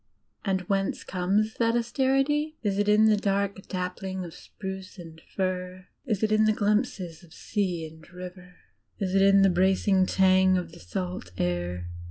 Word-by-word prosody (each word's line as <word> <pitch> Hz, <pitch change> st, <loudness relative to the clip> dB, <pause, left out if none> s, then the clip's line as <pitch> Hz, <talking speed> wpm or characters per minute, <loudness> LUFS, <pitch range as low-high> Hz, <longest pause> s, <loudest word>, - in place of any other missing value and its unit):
And 190 Hz, -2 st, 0 dB
whence 195 Hz, +1 st, -1 dB
comes 195 Hz, +4 st, 0 dB
that 230 Hz, 0 st, +2 dB
austerity? 270 Hz, +5 st, +1 dB
Is 200 Hz, -2 st, 0 dB
it 205 Hz, 0 st, +2 dB
in 210 Hz, +1 st, +5 dB
the 215 Hz, -1 st, +5 dB
dark 200 Hz, -1 st, -1 dB
dappling 185 Hz, 0 st, -4 dB
of 165 Hz, -, -9 dB
spruce 190 Hz, +1 st, -8 dB
and 165 Hz, -2 st, -11 dB
fir? 185 Hz, -1 st, -3 dB, 0.2 s
Is 215 Hz, -4 st, -1 dB
it 215 Hz, -, +2 dB
in 215 Hz, 0 st, +4 dB
the 215 Hz, -, +4 dB
glimpses 205 Hz, -5 st, -1 dB
of 160 Hz, -2 st, -16 dB
sea 185 Hz, -6 st, -2 dB
and 160 Hz, +1 st, -14 dB
river? 180 Hz, 0 st, -10 dB, 0.4 s
Is 190 Hz, -2 st, -2 dB
it 195 Hz, -, +4 dB
in 195 Hz, 0 st, +6 dB
the 195 Hz, -, +6 dB
bracing 190 Hz, +1 st, +3 dB
tang 190 Hz, 0 st, +4 dB
of 175 Hz, -2 st, -4 dB
the 170 Hz, -, -13 dB
salt 90 Hz, 0 st, -5 dB
air? 90 Hz, 0 st, -2 dB
190 Hz, 170 wpm, -27 LUFS, 180-205 Hz, 0.4 s, in